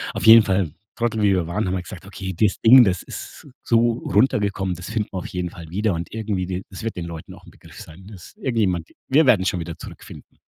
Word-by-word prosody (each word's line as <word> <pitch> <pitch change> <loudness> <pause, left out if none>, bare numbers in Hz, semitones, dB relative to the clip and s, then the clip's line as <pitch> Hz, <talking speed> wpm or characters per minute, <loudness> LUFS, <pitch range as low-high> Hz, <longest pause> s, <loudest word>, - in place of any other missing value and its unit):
Auf - - -3
jeden 110 0 +9
Fall, 95 -6 0 0.2
Trottel 115 -2 -1
wie 100 -2 +4
wir 90 -3 0
waren, 95 +3 -2
haben 90 - -1
wir 90 - -2
gesagt: 90 +1 -11
„Okay, 95 -2 -6
das 105 +2 +1
Ding, 125 +2 +8
das 95 -4 0
ist - - -10 0.2
so 120 0 +3 0.2
runtergekommen, 100 -3 +1
das 90 +1 -9
finden 110 -1 -2
wir 95 - -4
auf - - -7
jeden 90 -1 -4
Fall 85 -2 -11
wieder 105 +2 0
und 85 +1 -5
irgendwie 105 -4 -3
die 95 0 -4
das 95 - -9
wird 115 - -3
den 85 -1 -5
Leuten 85 -2 -9
auch - - -18
'n - - -15
Begriff - - -16
sein.“ 90 +5 -13
Das 95 -5 -13
irgendjemand 95 -10 -1 0.2
wir 150 +4 +4
werden 105 -7 +4
schon 90 - 0
wieder 85 0 -6
zurückfinden. - - -12
95 Hz, 240 wpm, -22 LUFS, 90-110 Hz, 0.2 s, jeden